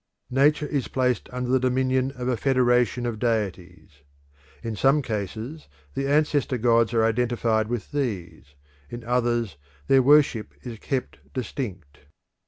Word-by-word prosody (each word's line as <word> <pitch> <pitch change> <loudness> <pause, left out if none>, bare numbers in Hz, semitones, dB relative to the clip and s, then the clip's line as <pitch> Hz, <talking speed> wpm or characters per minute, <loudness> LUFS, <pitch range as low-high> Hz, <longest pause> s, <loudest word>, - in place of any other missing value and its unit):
Nature 145 +3 +3
is 140 -3 -2
placed 125 -3 0
under 125 0 -3
the 130 +1 +3
dominion 130 +1 +1
of 125 0 -4
a 130 - +1
federation 125 -1 +2
of 115 -3 -3
deities. 95 -9 -3 0.6
In 115 -2 -3
some 135 +8 +3
cases 110 - -5 0.3
the 135 - -2
ancestor 145 -2 +2
gods 115 -1 +3
are 115 - +4
identified 115 -1 +1
with 120 -4 -4
these; 100 - -4 0.3
in 120 0 -7
others 120 - 0 0.3
their 135 - +5
worship 140 -5 +3
is 115 -3 -7
kept 130 +2 -3 0.2
distinct. 100 - -5
125 Hz, 135 wpm, -25 LUFS, 110-130 Hz, 0.6 s, their